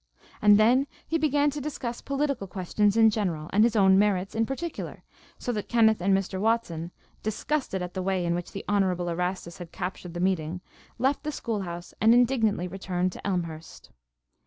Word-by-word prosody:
And 205 -1 +7
then 245 +6 +4 0.2
he 325 - 0
began 290 -1 +2
to 290 +1 -5
discuss 255 -5 -4
political 280 -6 -1
questions 200 +3 0
in 225 -1 +6
general 175 -7 -2
and 210 +2 +5
his 235 0 +2
own 190 -2 +5
merits 195 -2 +1
in 225 0 0
particular, 320 +5 -5 0.3
so 245 - -3
that 210 -3 -4
Kenneth 220 -4 +4
and 195 +2 +2
Mr. 190 -1 -3
Watson, 210 -7 0 0.3
disgusted 220 -2 -2
at 180 - -6
the 190 - -3
way 185 -1 0
in 170 - +1
which 175 0 -4
the 195 - -7
Honorable 185 -4 +1
Erastus 180 0 -3
had 175 -2 -8
captured 180 -1 -6
the - - -3
meeting, 180 -2 0 0.4
left 265 +4 +1
the 300 - -3
school 225 -7 -3
house 175 -1 -7
and 225 +2 +6
indignantly 225 -7 +2
returned 185 0 -2
to - - -7
Elmhurst. 170 -4 -4
200 Hz, 185 wpm, -27 LUFS, 180-235 Hz, 0.4 s, And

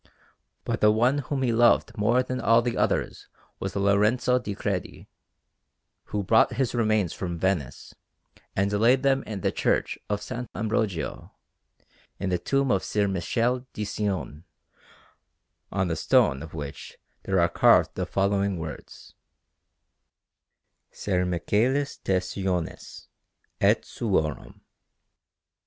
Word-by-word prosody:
But - - -2
the 105 - +6
one 120 +6 +3
whom 140 -1 -3
he 120 -2 +1
loved 120 +1 +3
more 120 +4 +2
than 130 0 -4
all 115 +1 +4
the 120 -1 -1
others - - -1 0.3
was - - -4
Lorenzo 105 +6 +2
di 105 -5 -5
Credi, 100 -3 -4 1.0
who 105 -1 -3
brought 110 +4 +4
his 130 -3 -1
remains 110 -6 +1
from 85 -2 -4
Venice 90 -5 -2 0.6
and 100 +1 0
laid 120 +6 +3
them 135 0 +3
in 105 -3 -5
the - - +1
Church - - 0
of 105 - +1
S. 125 +4 -6
Ambrogio, 105 -6 -2 0.9
in 95 0 -2
the 90 - +1
tomb 135 +6 +1
of 95 - +1
Ser 105 -1 0
Michele 120 +7 -1
di 105 - -3
Cione, 100 -7 -3 1.3
on 95 -1 0
the 80 - -1
stone 70 -3 +2
of 80 0 -9
which 70 -3 -7 0.3
there 95 -1 +1
are 85 - +4
carved 85 - +4
the - - -3
following 100 -1 0
words: 80 -3 -9 1.8
SER 90 -2 -1
MICHÆLIS 115 +11 0
DE 95 -1 +2
CIONIS, 90 -2 -4 0.5
ET - - +3
SUORUM. 80 -10 -2
100 Hz, 130 wpm, -26 LUFS, 90-120 Hz, 1.8 s, the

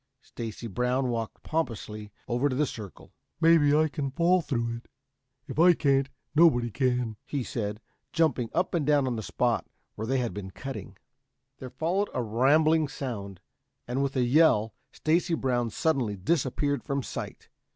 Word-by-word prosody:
Stacy 115 0 -7
Brown 125 +4 0
walked 115 -2 -4
pompously 110 -9 -3 0.2
over 125 +4 +1
to 130 - -2
the 150 +3 +2
circle. 105 -7 -9 0.3
"Maybe 165 -3 +5
I 155 +1 +4
can 140 -2 -3
fall 175 +6 +3
through 115 -6 -2
it. 115 - -15 0.6
If - - -5
I 175 +1 +7
can't, 135 -3 +2 0.2
nobody 135 -8 +4
can," 125 -3 0
he 140 -3 -3
said, 105 -3 -4 0.3
jumping 140 -8 +1
up 180 +2 0
and 170 -4 +1
down 145 -1 +3
on 125 -2 -1
the 110 - -3
spot - - 0 0.3
where 110 - -5
they 135 +2 +1
had 120 -6 -1
been 95 -1 -6
cutting. 120 +1 -8 0.6
There 130 - -7
followed 180 +9 -1
a 125 - 0
rambling 150 +8 +3
sound, 100 -9 -6 0.5
and 125 +3 -1
with 140 0 -1
a 130 - +2
yell, 120 -5 +4 0.2
Stacy 165 +2 +1
Brown 125 -5 0
suddenly 130 -5 0
disappeared 145 - 0
from 140 -2 -2
sight. - - -7
130 Hz, 160 wpm, -28 LUFS, 115-155 Hz, 0.6 s, I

